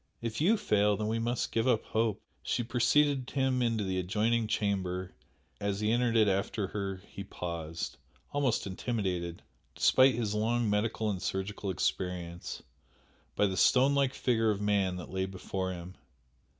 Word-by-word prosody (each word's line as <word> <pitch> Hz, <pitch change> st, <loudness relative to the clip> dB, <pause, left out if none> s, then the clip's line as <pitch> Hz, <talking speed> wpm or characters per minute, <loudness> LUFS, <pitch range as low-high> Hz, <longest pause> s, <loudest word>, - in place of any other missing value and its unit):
If 115 Hz, +3 st, -3 dB
YOU 210 Hz, +8 st, +4 dB
fail 105 Hz, -, +2 dB
then 105 Hz, -, -2 dB
we 115 Hz, +1 st, 0 dB
must 120 Hz, +1 st, -1 dB
give 115 Hz, +2 st, +1 dB
up 120 Hz, -4 st, +2 dB
hope." 110 Hz, -2 st, 0 dB, 0.2 s
She 120 Hz, -, -1 dB
preceded 130 Hz, +3 st, +2 dB
him 130 Hz, -2 st, +1 dB
into 115 Hz, -3 st, +1 dB
the 95 Hz, -1 st, -1 dB
adjoining 110 Hz, +5 st, +1 dB
chamber; 95 Hz, -3 st, -1 dB, 0.5 s
as 100 Hz, -1 st, -1 dB
he 105 Hz, +1 st, +1 dB
entered 120 Hz, 0 st, +2 dB
it 110 Hz, -1 st, +5 dB
after 100 Hz, +1 st, 0 dB
her 95 Hz, -2 st, -4 dB
he 100 Hz, -, -7 dB
paused 85 Hz, -4 st, -5 dB, 0.3 s
almost 140 Hz, -5 st, +1 dB
intimidated, 95 Hz, -4 st, -3 dB, 0.3 s
despite 130 Hz, -1 st, +5 dB
his 110 Hz, -3 st, -1 dB
long 115 Hz, +2 st, +1 dB
medical 105 Hz, +1 st, 0 dB
and 95 Hz, -3 st, -4 dB
surgical 100 Hz, +1 st, -3 dB
experience, 90 Hz, -1 st, -3 dB, 0.7 s
by 105 Hz, -, +3 dB
the 95 Hz, -2 st, -1 dB
stone 130 Hz, +8 st, +5 dB
like 140 Hz, -2 st, +2 dB
figure 115 Hz, -3 st, +2 dB
of 105 Hz, -2 st, 0 dB
man 100 Hz, -3 st, +1 dB
that 90 Hz, -, -8 dB
lay 95 Hz, 0 st, 0 dB
before 95 Hz, 0 st, -4 dB
him. 90 Hz, 0 st, -7 dB
105 Hz, 160 wpm, -31 LUFS, 95-115 Hz, 0.7 s, it